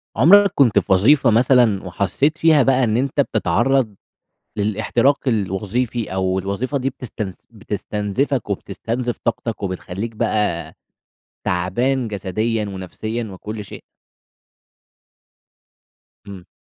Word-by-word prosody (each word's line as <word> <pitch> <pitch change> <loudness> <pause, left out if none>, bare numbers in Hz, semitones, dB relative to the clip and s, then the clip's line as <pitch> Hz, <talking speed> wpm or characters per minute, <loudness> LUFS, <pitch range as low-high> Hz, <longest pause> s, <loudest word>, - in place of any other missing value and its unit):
عُمرَك 200 - +6
كنت 120 -7 +4
في 95 - -5
وظيفة 130 +7 +4
مثلًا، 120 -3 +3
وحسِّيت 100 - 0
فيها 155 -4 +5
بقى 135 0 +3
إن 110 -2 +1
أنتَ 140 +3 +1
بتتعرَّض 115 +1 +1 0.6
للاحتراق 110 +6 +1
الوظيفي، 110 +2 -1
أو 95 0 0
الوظيفة 100 +9 -2
دي 135 0 -1
بتست 115 -7 -6
بتستنزفَك 105 +4 -3
وبتستنزف 115 +5 -3
طاقتَك، 115 -2 -2
وبتخلِّيك 95 +4 -5
بقى 105 -8 -1 0.7
تعبان 120 +9 0
جسديًا 105 +3 -2
ونفسيًا 105 +4 -5
وكل 105 +3 -7
شيء؟ - - -10 2.4
امم. 95 -3 -10
110 Hz, 100 wpm, -20 LUFS, 100-125 Hz, 2.4 s, عُمرَك